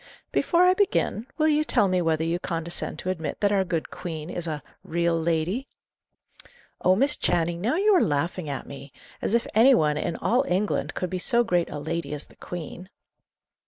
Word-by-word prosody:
"Before 345 0 +3
I 365 0 +6
begin, 375 - 0
will 310 - +3
you 305 0 +3
tell 240 -8 +3
me 185 -1 +1
whether 160 -1 +1
you 165 +2 -1
condescend 170 -1 -3
to 185 - -2
admit 165 -4 -4
that 205 -1 +2
our 195 -2 +3
good 170 -3 -3
Queen 160 -1 -6
is 175 -1 -3
a 150 -4 -4 0.2
'real 170 0 0
lady'?" 170 +10 -1 1.1
"Oh, 185 - +4
Miss 275 +8 +3
Channing, 170 0 0
now 235 - +1
you 410 +4 +4
are 360 - +5
laughing 155 +2 -1
at 140 - -4
me! 140 0 -10 0.3
As 225 - 0
if 235 - +1
any 250 +5 +6
one, 150 -6 +2
in 165 +2 -2
all 245 +3 +1
England, 190 +4 -1
could 180 - -3
be 185 - -2
so 240 +5 +3
great 175 -6 +1
a 150 - -5
lady 150 0 -3
as 145 - -5
the - - -21
Queen." 180 +1 -8
175 Hz, 195 wpm, -25 LUFS, 165-230 Hz, 1.1 s, I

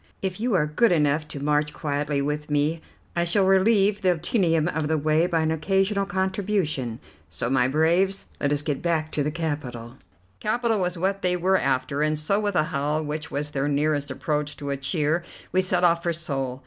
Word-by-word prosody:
If 190 0 -2
you 235 -2 +1
are 155 -5 +3
good 165 +9 +2
enough 150 -2 +2
to 145 - -7
march 150 +1 0
quietly 145 -1 -1
with 150 +1 -3
me, 150 +3 0 0.3
I 170 - +2
shall 180 +3 +2
relieve 200 +1 +3
the 180 -2 +2
tedium 165 -3 +1
of 160 -3 -1
the 160 0 +1
way 155 +3 +2
by 165 -2 +1
an 160 0 +1
occasional 195 +4 +1
contribution. 190 - -1 0.3
So, 115 +9 -3
my 130 -2 +3
braves, 170 +7 +2
let 140 - 0
us 145 0 0
get 145 -2 -2
back 160 -2 0
to 150 - -1
the 145 - 0
capital." 140 -7 -4 0.4
Capital 225 0 0
was 180 -1 -1
what 195 +3 -1
they 180 0 +2
were 185 +2 +2
after, 135 -1 0
and 155 0 +1
so 180 +7 +1
with 205 -2 -1
a 155 - +4
howl, 150 +2 0
which 150 +1 -4
was 145 +1 -3
their 140 -1 -1
nearest 145 0 0
approach 150 -1 -2
to 140 -1 -4
a 140 - -1
cheer, 150 +4 0 0.3
we 185 - +3
set 185 -1 0
off 170 -1 +4
for 170 0 0
Seoul. 135 -6 -3
155 Hz, 200 wpm, -25 LUFS, 145-185 Hz, 0.4 s, a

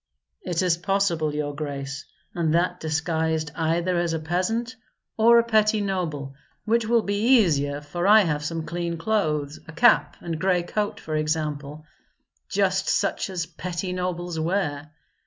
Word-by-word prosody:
"It 175 - -1
is 175 -2 +2
possible, 175 -5 0
your 145 -1 -2
grace; 140 -2 -5 0.3
and 165 -2 0
that 180 +1 +1
disguised 160 0 -1
either 170 +2 0
as 170 -1 0
a 160 - -1
peasant 205 +10 -1 0.4
or 230 +2 +6
a 235 - +5
petty 220 -1 +3
noble, 170 -9 -3 0.3
which 230 0 +1
will 230 -1 +3
be 215 +6 +3
easier, 145 -8 +1
for 175 +5 -3
I 215 +1 +8
have 150 -6 -1
some 160 +1 -3
clean 170 0 -3
clothes, 155 -7 -1
a - - -8
cap 165 - +3
and 165 -2 -5
gray 185 -2 +2
coat, 205 +3 -2
for 155 - -4
example, 155 -1 -2 0.6
just - - +1
such - - 0
as 180 -3 -3
petty 180 +2 -5
nobles 175 -2 -3
wear. 155 -4 -1
170 Hz, 155 wpm, -24 LUFS, 155-195 Hz, 0.6 s, I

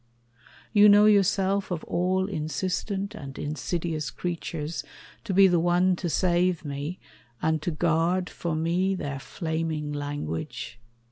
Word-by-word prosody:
You 210 -1 +8
know 205 +1 +7
yourself, 200 -1 +3
Of 175 -3 -3
all 185 +2 0
insistent 190 +4 -2
and 140 -9 -8
insidious 155 +1 -3
creatures, 165 -2 -4 0.4
To 215 - -2
be 195 +1 +7
the 175 -2 +3
one 175 +2 +3
to 175 - -2
save 175 0 +1
me, 145 +5 -4 0.4
and 160 -1 0
to 165 - -1
guard 170 +3 +1
For 170 -2 -3
me 175 +4 +1
their 140 -6 -4
flaming 160 -1 -3
language? 145 - -5
170 Hz, 130 wpm, -26 LUFS, 155-185 Hz, 0.4 s, You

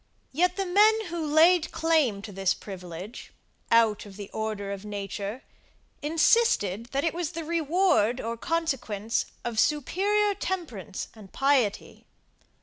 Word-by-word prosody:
Yet 355 +6 +1
the 390 - -1
men 430 +4 +4
who 340 -1 -3
laid 320 +3 +4
claim 300 -11 +1
to 210 - -7
this 195 -1 0
privilege, 185 +2 -9 0.4
out 225 -3 +3
of 195 -1 -12
the 205 -1 -8
order 215 -2 -3
of 200 0 -6
nature, 205 +2 -5 0.6
insisted, 295 - +2
that 275 +3 -2
it 330 - 0
was 345 -1 -3
the 330 0 -4
reward 325 - +2
or 230 +1 -3
consequence 240 - -1 0.2
of 235 -2 -2
superior 400 - +2
temperance 305 - -5
and 210 -4 -14
piety. 270 -7 0
265 Hz, 135 wpm, -27 LUFS, 205-335 Hz, 0.6 s, men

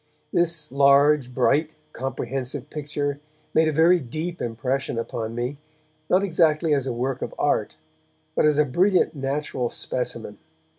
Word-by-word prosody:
This 165 -4 0
large, 140 0 +4
bright, 145 +5 +1 0.2
comprehensive 135 +2 -4
picture 145 -1 -3 0.3
made 160 0 +4
a - - +2
very 165 +4 +5
deep 160 +6 -5
impression 125 +2 -2
upon 115 -1 -4
me, 125 +4 -3 0.5
not 185 +2 +4
exactly 160 -4 +2
as 135 -2 0
a - - -1
work 125 +2 -2
of - - -5
art, - - 0 0.6
but - - +3
as 150 -1 +3
a 150 - +4
brilliant 180 +8 +2
natural 135 -3 -2
specimen. 115 -4 -4
140 Hz, 140 wpm, -24 LUFS, 125-155 Hz, 0.6 s, very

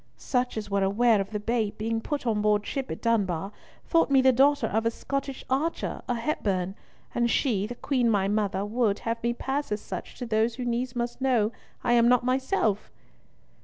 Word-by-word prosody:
Such 250 -3 -1
as 210 -1 -3
were 200 0 +2
aware 210 +2 +3
of 195 - -5
the 210 -1 -3
babe 220 -1 -1
being 225 +1 -1
put 290 +2 -3
on 215 -3 +1
board 210 0 +2
ship 270 -1 -3
at - - -6
Dunbar, 195 -5 0 0.3
thought 330 -3 +3
me 275 -1 +5
the 260 0 +6
daughter 280 +3 +4
of 220 +2 0
a 230 - +2
Scottish 275 +3 -4
archer, 290 +6 -1
a 245 - +1
Hepburn, 195 -8 -1 0.4
and 235 0 +1
she, 215 -5 +1
the 245 - -6
Queen 250 -2 +1
my 200 -3 +2
mother, 205 -1 0
would, 215 -1 +1
have 230 0 -1
me 235 +1 0
pass 270 +2 -3
as 210 - 0
such - - -7
to 250 - -4
those 225 0 +1
who 250 0 -4
needs 240 +1 -2
must 240 +1 -3
know 240 -5 +2 0.3
I 240 - +2
am 235 -1 +5
not 250 -1 +4
myself." 255 - 0
235 Hz, 200 wpm, -27 LUFS, 210-255 Hz, 0.4 s, the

